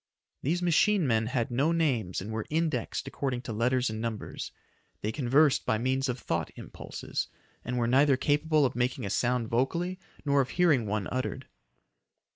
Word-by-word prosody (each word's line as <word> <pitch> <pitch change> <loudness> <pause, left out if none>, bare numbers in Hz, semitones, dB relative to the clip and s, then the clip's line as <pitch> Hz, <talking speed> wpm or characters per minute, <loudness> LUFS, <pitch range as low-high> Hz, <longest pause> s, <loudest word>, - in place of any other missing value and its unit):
These 175 +6 0
machine 180 +2 +3
men 115 -3 +2
had 120 -1 -1
no 140 +7 +2
names 130 - 0
and 105 +4 -6
were 110 -1 -3
indexed 160 -3 -1
according 130 -2 -3
to 115 - -5
letters 125 +3 +1
and 110 0 -3
numbers. 115 -2 -4 0.5
They 105 - -1
conversed 140 +3 +3
by 110 - +1
means 130 +3 0
of 125 - -1
thought - - -2
impulses, - - -5 0.4
and 125 - -3
were 120 - +1
neither 135 +3 +4
capable 150 +2 +2
of 130 - -1
making 120 -2 -1
a 100 - -3
sound 120 +1 +1
vocally 170 +11 0 0.3
nor 140 -1 +4
of 130 - -2
hearing 155 -11 +3
one 105 -1 -1
uttered. 130 0 -3
130 Hz, 170 wpm, -29 LUFS, 115-150 Hz, 0.5 s, neither